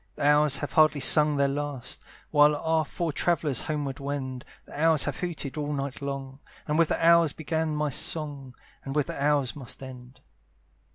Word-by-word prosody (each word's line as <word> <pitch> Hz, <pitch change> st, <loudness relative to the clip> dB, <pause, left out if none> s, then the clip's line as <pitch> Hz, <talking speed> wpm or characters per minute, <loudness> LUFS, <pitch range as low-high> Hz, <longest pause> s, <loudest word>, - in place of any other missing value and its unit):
The -, -, -5 dB
owls 150 Hz, -1 st, +4 dB
have -, -, -6 dB
hardly 155 Hz, -2 st, +4 dB
sung 150 Hz, +3 st, +6 dB
their 140 Hz, 0 st, +2 dB
last, 140 Hz, -3 st, -4 dB, 0.3 s
While 150 Hz, 0 st, +5 dB
our 160 Hz, +1 st, 0 dB
four 160 Hz, +2 st, -4 dB
travellers 150 Hz, -5 st, 0 dB
homeward 145 Hz, -3 st, -4 dB
wend; 135 Hz, -2 st, -5 dB, 0.2 s
The 150 Hz, -, -8 dB
owls 160 Hz, -3 st, +4 dB
have 145 Hz, -, -3 dB
hooted 160 Hz, -5 st, -5 dB
all 150 Hz, 0 st, -3 dB
night 140 Hz, 0 st, -5 dB
long, 140 Hz, -1 st, -6 dB, 0.3 s
And 150 Hz, +2 st, 0 dB
with 165 Hz, -, +4 dB
the 165 Hz, -, -1 dB
owls 170 Hz, -2 st, +5 dB
began 160 Hz, -1 st, -2 dB
my 150 Hz, -1 st, -1 dB
song, 140 Hz, -3 st, -2 dB, 0.3 s
And 135 Hz, +1 st, -6 dB
with 150 Hz, -2 st, +1 dB
the 140 Hz, -, -5 dB
owls 145 Hz, -3 st, +1 dB
must 135 Hz, -1 st, -8 dB
end. 130 Hz, 0 st, -12 dB
145 Hz, 180 wpm, -26 LUFS, 135-155 Hz, 0.3 s, sung